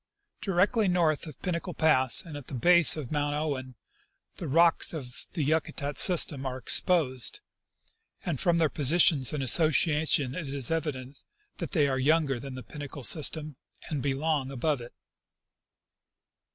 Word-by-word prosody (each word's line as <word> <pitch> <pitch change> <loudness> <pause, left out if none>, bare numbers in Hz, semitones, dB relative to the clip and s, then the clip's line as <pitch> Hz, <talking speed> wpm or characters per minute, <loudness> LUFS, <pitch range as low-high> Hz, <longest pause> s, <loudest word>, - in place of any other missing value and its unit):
Directly 200 +3 +1
north 170 -4 0
of 150 - -12
Pinnacle 180 0 -4
pass, 130 -6 +4
and 160 -3 -10
at 145 -3 -10
the 140 - -7
base 170 +5 +4
of 140 -6 -7
Mount 145 -1 -2
Owen, 135 -4 -4 0.6
the 170 - -6
rocks 165 +5 +2
of 130 -6 -8
the 160 - -2
Yakutat 145 -1 -2
system 160 -6 +4
are 130 -1 -4
exposed, 130 - +1 0.9
and 165 -8 -3
from 170 -1 +1
their 165 -2 +2
position 155 +1 +2
and 150 -3 -4
association 150 -1 +2
it 160 0 -6
is 135 -2 +1
evident 145 -5 -4 0.4
that - - -6
they 150 -6 +2
are 130 -1 -2
younger 145 -2 +1
than 135 +1 -9
the 130 - -9
Pinnacle 145 -2 -9
system 155 0 0 0.3
and 145 -3 -3
belong 140 0 -2
above 135 +1 -2
it. 120 - -12
150 Hz, 150 wpm, -27 LUFS, 135-165 Hz, 0.9 s, pass